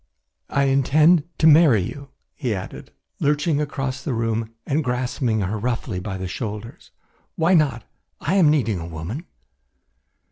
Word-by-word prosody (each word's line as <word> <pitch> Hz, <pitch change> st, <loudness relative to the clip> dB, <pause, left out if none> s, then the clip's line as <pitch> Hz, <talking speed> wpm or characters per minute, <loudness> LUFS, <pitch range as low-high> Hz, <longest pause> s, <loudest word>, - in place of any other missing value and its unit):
"I 140 Hz, -, +1 dB
intend 145 Hz, +4 st, +4 dB
to 155 Hz, -, +1 dB
marry 150 Hz, -, +6 dB
you," 140 Hz, +8 st, -7 dB, 0.2 s
he 125 Hz, -7 st, -2 dB
added, 95 Hz, -, -8 dB, 0.3 s
lurching 150 Hz, +1 st, +1 dB
across 135 Hz, -2 st, -3 dB
the 140 Hz, -4 st, -3 dB
room 115 Hz, -1 st, -1 dB, 0.2 s
and 150 Hz, +3 st, 0 dB
grasping 125 Hz, -3 st, -1 dB
her 100 Hz, +3 st, -2 dB
roughly 115 Hz, -3 st, -2 dB
by 95 Hz, +1 st, -5 dB
the 95 Hz, 0 st, -4 dB
shoulders. 105 Hz, +3 st, -6 dB, 0.5 s
"Why 170 Hz, +3 st, +2 dB
not? 140 Hz, -9 st, +2 dB, 0.4 s
I 160 Hz, -, -1 dB
am 185 Hz, -6 st, +5 dB
needing 120 Hz, -, +1 dB
a 80 Hz, -, -6 dB
woman." 85 Hz, -, -6 dB
130 Hz, 145 wpm, -22 LUFS, 110-150 Hz, 0.5 s, marry